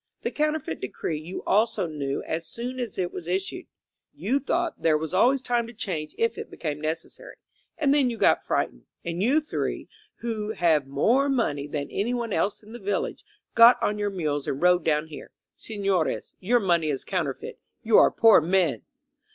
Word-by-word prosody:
The - - -1
Counterfeit 305 - -1
Decree 150 +4 -3
you 165 +4 -7
also 215 -1 +2
knew 145 -4 -3
as 165 +1 -4
soon 250 +2 -5
as 240 -5 -4
it 180 -2 -2
was 170 - -7
issued. 195 - -3 0.5
You 275 - 0
thought 340 +4 -2
there 155 -2 +3
was 160 +2 -5
always 255 +7 +3
time 240 -2 0
to 235 - -10
change 175 -9 -4
if 230 0 0
it - - -7
became 150 -2 -5
necessary. 165 - -5 0.4
And 290 -4 +3
then 280 -4 +3
you 235 - -4
got - - +3
frightened, - - -2 0.2
and 170 +1 -3
you 260 +9 +4
three, 310 - -3 0.3
who 220 -2 -3
have 160 -7 +2
more 235 - +2
money 150 - 0
than 145 -1 -4
anyone 235 +1 -1
else 205 - -1
in 210 - -14
the 240 - -8
village, 200 0 -2 0.3
got 230 +2 +8
on 210 0 0
your 205 0 0
mules 150 -7 -2
and 135 - -2
rode 180 +1 +4
down 150 0 +1
here. 160 -2 -11 0.2
Sefiores, 195 -6 -2
your 240 +6 +2
money 170 -6 +1
is 140 -3 -2
counterfeit. 165 -9 -3 0.2
You 225 -1 +6
are - - +6
poor 225 -6 +6
men 175 -1 +1
195 Hz, 185 wpm, -26 LUFS, 160-235 Hz, 0.5 s, got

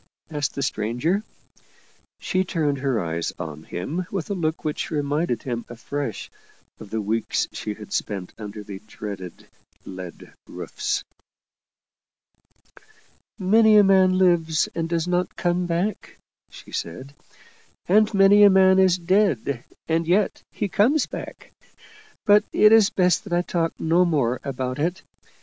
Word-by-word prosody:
asked 145 -2 -2
the 140 - -2
stranger. 125 - -1 1.0
She 185 0 0
turned 150 -6 -1
her 130 -4 0
eyes 85 -1 -2
on 80 -1 -7
him 155 - -4
with 195 0 -4
a - - +1
look 160 -4 -2
which 150 - -2
reminded 145 -3 -1
him 120 -3 -3
afresh 120 +1 -5 0.5
of 105 - -11
the 110 - -2
weeks 110 +2 -1
she 105 -1 -5
had 105 -1 -10
spent 95 -4 -3
under 105 -1 -8
the 100 -2 -8
dreaded 100 -5 -8 0.2
" - - -38
lead 90 -2 -9
roofs." - - -3 0.8
" - - -43 0.6
Many 215 +3 +5
a 205 - +8
man 190 -1 +4
lives 170 -4 +2
and 165 -1 -3
does 170 0 -1
not 180 0 -1
come 175 0 0
back," 175 +5 -3 0.3
she - - -14
said. 110 +13 -6 0.4
" - - -31 0.3
And 215 +3 +4
many 200 0 +6
a 205 - +9
man 190 0 +5
is 185 -2 +4
dead 170 - +1 0.2
and 165 0 0
yet 195 +4 +1
he - - -2
comes 240 - +2
back. - - -9 0.7
But 205 0 +6
it's 215 -1 +6
best 180 +1 +2
that 190 - -5
I 175 0 +2
talk 165 -2 -2
no 165 +3 +3
more 135 -8 0
about 130 -1 -4
it. 175 +5 -2
165 Hz, 145 wpm, -23 LUFS, 120-185 Hz, 1.0 s, a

